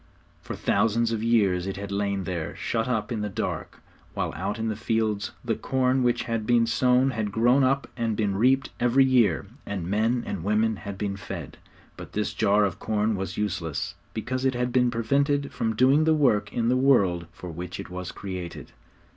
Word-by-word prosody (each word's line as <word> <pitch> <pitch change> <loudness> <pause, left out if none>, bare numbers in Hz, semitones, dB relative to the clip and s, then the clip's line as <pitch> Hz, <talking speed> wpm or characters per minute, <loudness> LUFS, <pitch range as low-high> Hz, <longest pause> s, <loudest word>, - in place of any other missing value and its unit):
For - - -6
thousands 115 +1 +1
of 110 -2 -1
years 100 -6 +2
it 95 - -4
had 100 0 -6
lain 100 -1 -1
there, 85 -3 -4
shut 115 0 -2
up 110 -2 -1
in 110 -3 -2
the 105 - -2
dark, - - -4 0.3
while - - -2
out 105 - -3
in 115 0 -2
the 110 - -1
fields 110 -1 -1 0.2
the 115 - +1
corn 130 +3 +1
which 120 -1 +1
had 115 -2 -3
been 120 -1 +4
sown 125 +3 +3
had 110 -4 -2
grown 120 +6 +4
up 135 +2 +1
and 115 -3 -1
been 100 -3 0
reaped 130 +6 +2
every 125 +2 +4
year, 125 -7 +3 0.2
and 95 -4 -4
men 110 +6 +1
and 85 - -4
women 105 +2 +1
had 100 -1 -7
been 100 -1 -3
fed. 95 - -7 0.4
But - - -10
this 105 0 -1
jar 105 -1 +3
of 95 -2 -3
corn 110 0 0
was 95 0 -4
useless, 90 -7 -2 0.2
because 130 +4 -3
it 130 -1 +1
had 125 0 -1
been 125 0 +3
prevented 140 +5 +1
from 110 -1 -1
doing 135 +6 +4
the 160 0 +4
work 105 -9 +2
in 115 -1 0
the 125 - +3
world 95 -11 +3
for 90 0 -9
which 90 +2 -6
it - - -7
was 90 0 -5
created. 90 -3 -7
110 Hz, 195 wpm, -26 LUFS, 100-125 Hz, 0.4 s, been